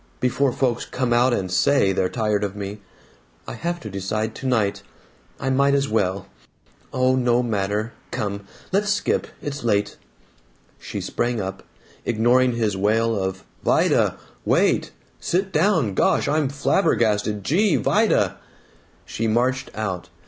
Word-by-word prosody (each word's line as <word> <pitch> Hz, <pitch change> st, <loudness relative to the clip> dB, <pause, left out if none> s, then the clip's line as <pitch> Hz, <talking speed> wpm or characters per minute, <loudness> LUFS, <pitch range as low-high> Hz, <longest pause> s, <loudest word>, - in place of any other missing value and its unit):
Before 130 Hz, +2 st, +1 dB
folks 125 Hz, -2 st, 0 dB
come 125 Hz, -2 st, -1 dB
out 120 Hz, +2 st, +4 dB
and 95 Hz, -6 st, -1 dB
SAY 95 Hz, +2 st, +3 dB
they're 95 Hz, -1 st, 0 dB
tired 105 Hz, -3 st, 0 dB
of 100 Hz, -1 st, -3 dB
me. 100 Hz, 0 st, -6 dB, 0.7 s
I -, -, -5 dB
have 170 Hz, +8 st, -3 dB
to 110 Hz, -, -7 dB
decide 110 Hz, +3 st, -2 dB
tonight. 115 Hz, -7 st, 0 dB, 0.6 s
I 135 Hz, -1 st, -1 dB
might 140 Hz, +1 st, +3 dB
as 140 Hz, 0 st, +1 dB
well 100 Hz, -3 st, 0 dB, 0.7 s
Oh, 130 Hz, 0 st, +2 dB
no 125 Hz, -1 st, +2 dB
matter. 105 Hz, 0 st, -1 dB, 0.2 s
Come. 100 Hz, -1 st, -4 dB, 0.2 s
Let's 205 Hz, +2 st, +1 dB
skip. 205 Hz, 0 st, 0 dB, 0.2 s
It's 145 Hz, -2 st, -5 dB
late." 105 Hz, -3 st, 0 dB, 0.8 s
She -, -, -6 dB
sprang 120 Hz, -1 st, -1 dB
up, 95 Hz, -1 st, -4 dB, 0.4 s
ignoring 120 Hz, +2 st, +3 dB
his 110 Hz, -4 st, 0 dB
wail 110 Hz, +4 st, +1 dB
of 95 Hz, -1 st, -3 dB, 0.2 s
"Vida! -, -, +2 dB, 0.3 s
Wait! -, -, +2 dB, 0.3 s
Sit 190 Hz, +1 st, -1 dB
down! 160 Hz, -, +2 dB
Gosh! -, -, +2 dB
I'm 150 Hz, -1 st, +1 dB
flabbergasted! 110 Hz, -, +1 dB
Gee! 195 Hz, -, +2 dB
Vida!" 150 Hz, -, +2 dB, 0.7 s
She 115 Hz, -, -2 dB
marched 125 Hz, +4 st, +1 dB
out. 95 Hz, -6 st, -4 dB
115 Hz, 135 wpm, -23 LUFS, 100-135 Hz, 0.8 s, out